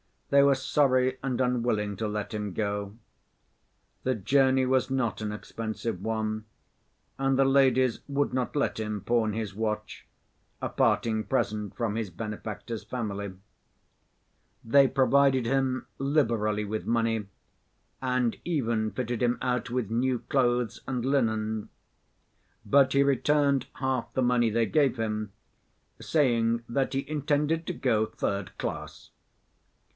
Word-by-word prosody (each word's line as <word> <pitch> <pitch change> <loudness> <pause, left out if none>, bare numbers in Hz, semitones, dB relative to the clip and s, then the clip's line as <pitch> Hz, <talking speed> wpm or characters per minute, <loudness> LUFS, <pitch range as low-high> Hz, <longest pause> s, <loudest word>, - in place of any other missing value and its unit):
They 140 0 +7
were 140 -1 +5
sorry 130 -1 +2
and 130 -2 -2
unwilling 115 -5 0
to 110 - -2
let 105 +1 -4
him 105 -2 -3
go. 100 0 -2 1.1
The 130 0 +1
journey 130 +4 +3
was 130 0 +2
not 130 -5 -1
an 105 -1 -2
expensive 110 -2 -5
one, 110 0 -2 0.7
and 135 -1 +2
the 135 - +5
ladies 130 -2 +3
would 140 0 0
not 130 +1 -1
let 140 -5 0
him 105 -2 -3
pawn 115 -1 +1
his 110 -2 -3
watch, 110 0 -4 0.5
a - - -2
parting 110 -2 +1
present 105 -5 -1
from 115 -3 -1
his 110 -3 -2
benefactor's 105 +3 -6
family. 100 -5 -4 1.3
They 135 +4 +5
provided 135 -1 +3
him 130 +1 0
liberally 115 -7 +1
with 105 +1 -4
money 115 -2 +1 0.7
and 125 -2 0
even 115 -10 0
fitted 120 -2 -3
him 120 0 +2
out 125 -2 -1
with 120 -3 -2
new 125 +2 +1
clothes 120 -3 0
and 125 -2 -2
linen. 110 -5 0 1.0
But 135 -1 +4
he 140 0 +5
returned 140 -1 +2
half 130 -2 -2
the 130 - +1
money 120 -1 +3
they 115 +1 +2
gave 140 -1 +2
him, 110 -2 -3 0.7
saying 120 -6 +1
that 135 +3 0
he 135 +1 -2
intended 150 +2 0
to - - -1
go 110 -4 +1
third 100 -3 -3
class. - - -6
120 Hz, 130 wpm, -28 LUFS, 110-135 Hz, 1.3 s, They